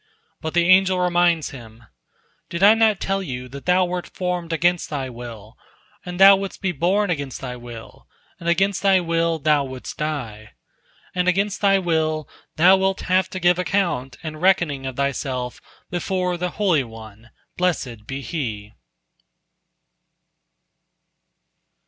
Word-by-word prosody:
But 160 +1 -4
the 170 0 +3
angel 185 0 +5
reminds 175 -2 +2
him: 115 -3 -12 0.7
"Did 170 +2 -3
I 205 +2 +9
not 225 -2 +3
tell 195 0 -1
thee 125 -9 -5
that 140 +4 -11
thou 180 +1 +4
wert 180 0 -4
formed 180 -2 -3
against 175 +2 +1
thy 135 -4 -4
will, 115 -3 -10 0.5
and 180 0 -7
thou 195 +1 +9
wouldst 195 0 -6
be 190 -1 -1
born 180 +5 +1
against 140 -5 -4
thy 125 -2 -6
will, 120 -2 -11 0.3
and 170 - -3
against 190 +3 +1
thy 195 -1 +4
will 165 -1 0
thou 150 -1 +2
wouldst 130 -1 -8
die? 115 -9 -4 0.6
And 180 0 0
against 195 +3 +1
thy 195 -1 +4
will 160 -4 0 0.3
thou 185 +4 +6
wilt 190 0 0
have 185 0 +1
to 185 - -5
give 175 0 +3
account 170 -9 -1
and 155 -1 -6
reckoning 175 -8 +2
of 130 - -5
thyself 130 -2 -3 0.3
before 180 0 -1
the 180 +1 -2
Holy 180 -9 +2
One, 110 -1 -12 0.3
blessed 125 -12 -2
be 135 +1 -5
He." 110 -7 -5
170 Hz, 145 wpm, -22 LUFS, 130-185 Hz, 0.7 s, I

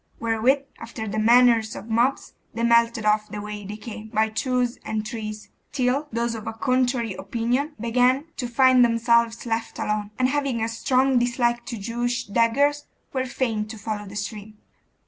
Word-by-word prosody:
Wherewith, 230 +5 +2 0.2
after 225 -1 -6
the 215 +1 -2
manner 235 +1 +6
of 215 - -8
mobs, 235 +4 0 0.2
they 230 - -2
melted 235 -1 +3
off 210 0 +2
the 210 - -6
way 210 0 -6
they 205 +2 -7
came, 220 0 -8
by 220 0 +1
twos 250 +2 -1
and 215 0 -3
threes, 215 -2 -6 0.2
till 270 +2 0
those 235 0 -1
of 220 -2 -7
a - - -3
contrary 250 -2 0
opinion 240 +10 -2
began 250 +4 +2
to 245 - -2
find 255 +1 +5
themselves 235 0 +2
left 225 -1 -3
alone, 210 -1 -2
and 255 - +3
having 275 -4 -1
a - - 0
strong 255 +3 +2
dislike 240 0 0
to 240 -4 -4
Jewish 240 +3 -2
daggers, 270 +8 +2 0.3
were 260 -1 -1
fain 225 -4 -2
to 220 +1 -8
follow 210 -1 -5
the 200 - -10
stream. 210 +1 -6
235 Hz, 170 wpm, -24 LUFS, 220-250 Hz, 0.3 s, manner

